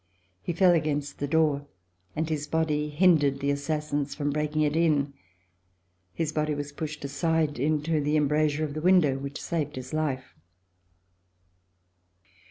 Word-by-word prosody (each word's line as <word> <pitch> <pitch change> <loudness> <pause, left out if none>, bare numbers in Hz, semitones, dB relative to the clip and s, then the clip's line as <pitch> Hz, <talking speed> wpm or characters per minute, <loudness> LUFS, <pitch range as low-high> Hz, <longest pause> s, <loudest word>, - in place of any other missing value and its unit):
He - - -3
fell 180 +2 +4
against 150 -3 -1
the 145 - -1
door, 145 -2 +1 0.5
and 160 - -1
his 150 -2 -2
body 150 -1 0
hindered 150 -4 +3
the 140 0 0
assassins 145 -1 -2
from 145 -1 -1
break 150 +1 -2
ing 155 - +3
it 150 0 +1
in. 150 -4 +2 1.0
His 155 - -2
body 150 -1 -1
was 145 0 -5
pushed 150 0 -6
aside 150 +1 0
into 155 +2 +1
the 150 +1 0
embra 150 +1 +3
sure 150 +2 -1
of 145 - -6
the 155 - -4
window, 165 -6 +4
which 140 +1 -6
saved 155 -3 -3
his 130 +1 -7
life. 140 -5 -2
150 Hz, 155 wpm, -27 LUFS, 145-155 Hz, 1.0 s, fell